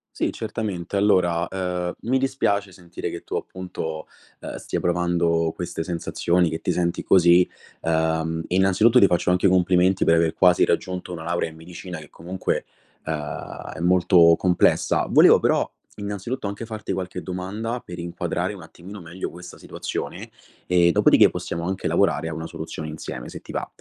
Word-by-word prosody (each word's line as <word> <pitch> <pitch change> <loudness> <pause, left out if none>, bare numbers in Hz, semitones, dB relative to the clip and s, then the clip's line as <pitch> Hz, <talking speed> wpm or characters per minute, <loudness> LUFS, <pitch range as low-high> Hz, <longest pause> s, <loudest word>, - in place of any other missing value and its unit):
Sì, - - 0
certamente. 100 -3 -4
Allora, 90 -4 +2
ehm, 90 -2 -3
mi 130 +3 +1
dispiace 105 -7 0
sentire 90 -2 -7
che 85 - -7
tu, - - -6
appunto, 80 -4 -5 0.3
uhm, - - -7
stia - - -4
provando 85 -2 +1
queste 85 -2 -4
sensazioni, 85 0 0
che 80 - -4
ti - - -2
senti 85 -1 0
così. 90 -1 +5 0.3
Uhm, 80 0 0
innanzitutto 95 +6 +4
ti 100 - +7
faccio 90 0 +1
anche 90 +2 +3
i - - +6
complimenti 90 0 +3
per 85 - +4
aver 80 -1 +2
quasi 90 -1 +4
raggiunto 90 0 -2
una 80 -2 -6
laurea 85 0 -1
in 80 - -13
medicina, 90 +2 -9
che 75 -2 -11
comunque, 90 +3 -3 0.4
uhm, 80 0 -5
è - - -8
molto 85 -1 +5
complessa. 90 -2 +2
Volevo - - +7
però - - +2 0.3
innanzitutto 100 +4 -4
anche 100 +3 -5
farti 110 -3 -5
qualche 90 -1 -4
domanda 105 +6 -4
per 90 0 -10
inquadrare 85 0 -3
un - - -10
attimino 95 +3 -11
meglio 85 +2 -6
questa 90 +1 -11
situazione, - - -6 0.4
e 85 -1 +4
dopo - - +3
di - - +6
ce, - - +7
possiamo 85 0 -4
anche 95 0 -2
lavorare 80 - +1
a 80 - -4
una 80 +1 -5
soluzione 80 -1 -6
insieme 75 -5 -7
se - - -8
ti - - -13
va. - - -3
90 Hz, 170 wpm, -23 LUFS, 85-95 Hz, 0.4 s, ti